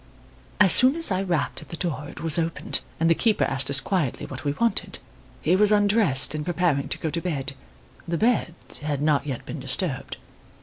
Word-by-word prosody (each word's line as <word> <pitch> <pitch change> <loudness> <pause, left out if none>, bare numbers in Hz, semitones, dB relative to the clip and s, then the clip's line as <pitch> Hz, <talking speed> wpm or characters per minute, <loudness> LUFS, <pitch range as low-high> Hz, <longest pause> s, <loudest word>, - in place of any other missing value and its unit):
"As 200 -4 +6
soon 255 +3 +7
as 330 -8 +4
I 185 0 0
rapped 175 -7 -2
at - - -14
the 170 - -7
door 150 -5 -4
it - - -11
was 165 0 +1
opened, 165 0 -1 0.2
and 165 - +2
the 165 - +5
keeper 215 +4 +1
asked 135 0 0
us 140 -1 +4
quietly 155 -3 -2
what 130 - -9
we 145 - -1
wanted. 235 +9 -1 0.5
He - - +3
was 210 +2 +3
undressed 205 - +3
and 155 -1 -3
preparing 170 -4 -1
to - - -1
go 160 - -4
to 170 - -3
bed. 140 -6 -3 0.5
The 170 0 -2
bed 215 -6 0 0.3
had 145 -1 -3
not 150 -1 +1
yet 130 -4 -5
been - - -7
disturbed. - - -3
165 Hz, 205 wpm, -24 LUFS, 145-195 Hz, 0.5 s, soon